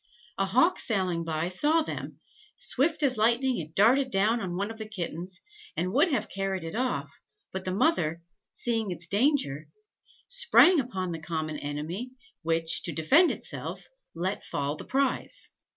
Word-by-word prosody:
A 195 Hz, -, +2 dB
hawk 260 Hz, -, +3 dB
sailing 185 Hz, -6 st, 0 dB
by, 160 Hz, 0 st, -1 dB
saw 300 Hz, -, +3 dB
them: -, -, -6 dB, 0.4 s
swift 300 Hz, +4 st, 0 dB
as 260 Hz, -4 st, +2 dB
lightning 240 Hz, +3 st, +2 dB
it 160 Hz, -1 st, -8 dB
darted 255 Hz, +6 st, +4 dB
down 220 Hz, +2 st, +2 dB
on 180 Hz, -3 st, -3 dB
one 200 Hz, +4 st, -2 dB
of 225 Hz, -, -9 dB
the 215 Hz, -1 st, -6 dB
kittens, 180 Hz, -2 st, -5 dB, 0.4 s
and 185 Hz, +2 st, -1 dB
would 295 Hz, +7 st, +5 dB
have 285 Hz, -6 st, 0 dB
carried 195 Hz, -2 st, -2 dB
it 165 Hz, -, -6 dB
off, 250 Hz, +2 st, -2 dB, 0.3 s
but 190 Hz, 0 st, -4 dB
the 185 Hz, -, -1 dB
mother, 170 Hz, -, +1 dB, 0.3 s
seeing 225 Hz, -3 st, -1 dB
its 175 Hz, -2 st, -6 dB
danger, 200 Hz, -, +1 dB, 0.6 s
sprang 370 Hz, -8 st, +5 dB
upon 190 Hz, -9 st, -3 dB
the 165 Hz, -, -4 dB
common 155 Hz, -2 st, -3 dB
enemy, 160 Hz, -, -5 dB, 0.3 s
which, 165 Hz, 0 st, +1 dB
to 170 Hz, -, -1 dB
defend 270 Hz, -, +4 dB
itself, -, -, -5 dB, 0.3 s
let 185 Hz, +4 st, -2 dB
fall 145 Hz, +1 st, -2 dB
the -, -, -8 dB
prize. 275 Hz, -, 0 dB
195 Hz, 160 wpm, -28 LUFS, 165-255 Hz, 0.6 s, would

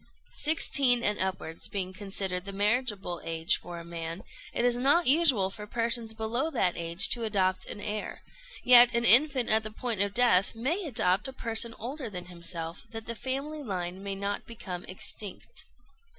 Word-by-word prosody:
Sixteen 275 Hz, -5 st, +4 dB
and 210 Hz, -, 0 dB
upwards 185 Hz, -3 st, -3 dB
being 195 Hz, -3 st, -4 dB
considered 190 Hz, -2 st, -3 dB
the 200 Hz, -, -5 dB
marriageable 205 Hz, -3 st, -1 dB
age 165 Hz, 0 st, +1 dB
for 175 Hz, -1 st, -9 dB
a 170 Hz, -, -10 dB
man, 165 Hz, +1 st, -6 dB, 0.3 s
it 240 Hz, -, -1 dB
is 245 Hz, -1 st, +2 dB
not 280 Hz, +8 st, +2 dB
usual 260 Hz, -, +3 dB
for 210 Hz, +1 st, -9 dB
persons 230 Hz, 0 st, -1 dB
below 230 Hz, +7 st, -2 dB
that 190 Hz, -, 0 dB
age 170 Hz, +2 st, +2 dB
to 235 Hz, -, +1 dB
adopt 190 Hz, -4 st, 0 dB
an -, -, -7 dB
heir; 210 Hz, 0 st, -5 dB, 0.4 s
yet 245 Hz, -1 st, +8 dB
an 235 Hz, 0 st, +2 dB
infant 260 Hz, +1 st, +6 dB
at 220 Hz, 0 st, +4 dB
the 215 Hz, -, -6 dB
point 220 Hz, -1 st, -3 dB
of 200 Hz, 0 st, -1 dB
death 230 Hz, -5 st, +4 dB
may 310 Hz, -, -2 dB
adopt 215 Hz, -7 st, 0 dB
a 265 Hz, -, -8 dB
person 230 Hz, -1 st, +1 dB
older 260 Hz, +1 st, -6 dB
than 180 Hz, -3 st, -7 dB
himself, 170 Hz, -1 st, -6 dB
that 225 Hz, -1 st, -7 dB
the 235 Hz, -, -4 dB
family 275 Hz, +6 st, -4 dB
line 185 Hz, -6 st, -5 dB
may 200 Hz, 0 st, -4 dB
not 200 Hz, +1 st, -4 dB
become 185 Hz, -6 st, -7 dB
extinct. 195 Hz, -, -7 dB
215 Hz, 175 wpm, -28 LUFS, 185-245 Hz, 0.4 s, yet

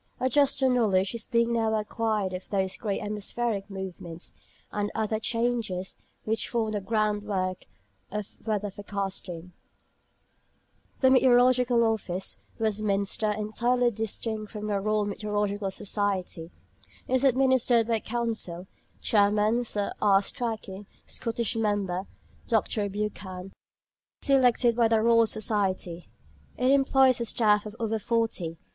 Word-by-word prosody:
A 260 Hz, -, +1 dB
juster 275 Hz, -1 st, +3 dB
knowledge 210 Hz, -6 st, +2 dB
is 235 Hz, -, -4 dB
being 235 Hz, -1 st, +2 dB
now 225 Hz, -1 st, +1 dB
acquired 215 Hz, -2 st, -1 dB
of 185 Hz, 0 st, -6 dB
those 190 Hz, -2 st, 0 dB
great 200 Hz, 0 st, -3 dB
atmospheric 210 Hz, 0 st, -2 dB
movements, 185 Hz, -3 st, -7 dB, 0.4 s
and 205 Hz, 0 st, -1 dB
other 220 Hz, 0 st, 0 dB
changes, 230 Hz, -5 st, -1 dB, 0.2 s
which 220 Hz, +1 st, -1 dB
form 225 Hz, -2 st, 0 dB
the 205 Hz, -1 st, -2 dB
groundwork 205 Hz, -3 st, -1 dB, 0.5 s
of 210 Hz, 0 st, -5 dB
weather 210 Hz, -2 st, -1 dB
forecasting. 190 Hz, -3 st, -5 dB, 1.5 s
The 260 Hz, -1 st, +6 dB
Meteorological 250 Hz, -2 st, +5 dB
Office, 195 Hz, -5 st, -2 dB
Westminster 215 Hz, -1 st, 0 dB
(entirely 235 Hz, +4 st, +1 dB
distinct 220 Hz, 0 st, -3 dB
from 210 Hz, -1 st, -6 dB
the 205 Hz, -2 st, 0 dB
Royal 215 Hz, 0 st, +1 dB
Meteorological 205 Hz, -1 st, -2 dB
Society), 190 Hz, -4 st, -2 dB, 0.6 s
is 260 Hz, +1 st, +2 dB
administered 260 Hz, -3 st, +3 dB
by 230 Hz, -1 st, +2 dB
a -, -, -8 dB
Council 225 Hz, -7 st, -3 dB, 0.4 s
(Chairman, 210 Hz, +3 st, +3 dB
Sir 205 Hz, -3 st, -2 dB
R. 200 Hz, -1 st, +5 dB
Strachey; 210 Hz, -4 st, -4 dB, 0.2 s
Scottish 230 Hz, 0 st, -1 dB
member, 200 Hz, -4 st, -1 dB, 0.4 s
Dr. 215 Hz, -2 st, +1 dB
Buchan), 195 Hz, -2 st, -5 dB, 0.7 s
selected 250 Hz, -4 st, +4 dB
by 235 Hz, -1 st, +4 dB
the 225 Hz, 0 st, +3 dB
Royal 230 Hz, 0 st, +4 dB
Society. 190 Hz, -6 st, -2 dB, 0.5 s
It 255 Hz, +1 st, +3 dB
employs 270 Hz, -2 st, +4 dB
a -, -, 0 dB
staff 210 Hz, -2 st, +2 dB
of 210 Hz, -, -9 dB
over 225 Hz, -1 st, -1 dB
forty. 215 Hz, -8 st, -1 dB
215 Hz, 120 wpm, -27 LUFS, 200-235 Hz, 1.5 s, The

